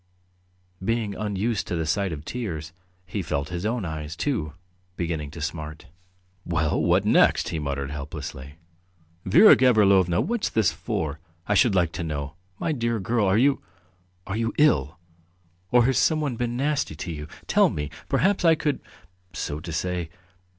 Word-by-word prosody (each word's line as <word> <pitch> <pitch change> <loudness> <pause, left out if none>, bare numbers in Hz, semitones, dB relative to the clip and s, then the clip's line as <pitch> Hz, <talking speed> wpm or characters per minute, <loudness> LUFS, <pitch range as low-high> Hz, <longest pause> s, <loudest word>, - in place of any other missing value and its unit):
Being 115 -1 0
unused 105 +2 -2
to - - -2
the 80 -1 -1
sight 95 +4 0
of 75 -1 -6
tears, 85 -10 -5 0.3
he 100 +3 -3
felt 75 -3 -2
his 90 +3 -3
own 115 -3 -2
eyes, 80 -1 -5
too, 85 - -2 0.4
beginning 80 -4 -2
to 80 +2 -9
smart. 75 0 -5 0.6
"Well, 80 -3 0
what - - +3
next!" - - +4
he 80 - -3
muttered 70 -1 -3
helplessly. 70 -1 -7 0.7
"Vera 120 - +8
Gavrilovna, 100 -8 +4
what's 235 -2 0
this 110 -5 +2
for, 75 0 -3 0.3
I 105 - +2
should 105 0 +4
like 85 -3 +2
to 85 - -4
know? 75 -2 -4 0.2
My 160 - -1
dear 115 -5 -1
girl, 105 +2 +1
are 95 +2 +3
you... 135 +3 +3 0.6
are 95 - -4
you 115 0 -1
ill? 80 - +3 0.7
Or 120 -1 +5
has 135 +1 +2
someone 155 -5 +1
been 120 0 -2
nasty 145 - 0
to 85 +3 -5
you? 75 -1 -6 0.2
Tell - - +4
me, 75 0 -4 0.2
perhaps 190 +9 +2
I 165 -2 +6
could, 150 -3 -1 0.5
so 75 - -4
to 85 +1 -7
say 90 +1 -2
90 Hz, 160 wpm, -25 LUFS, 80-115 Hz, 0.7 s, Vera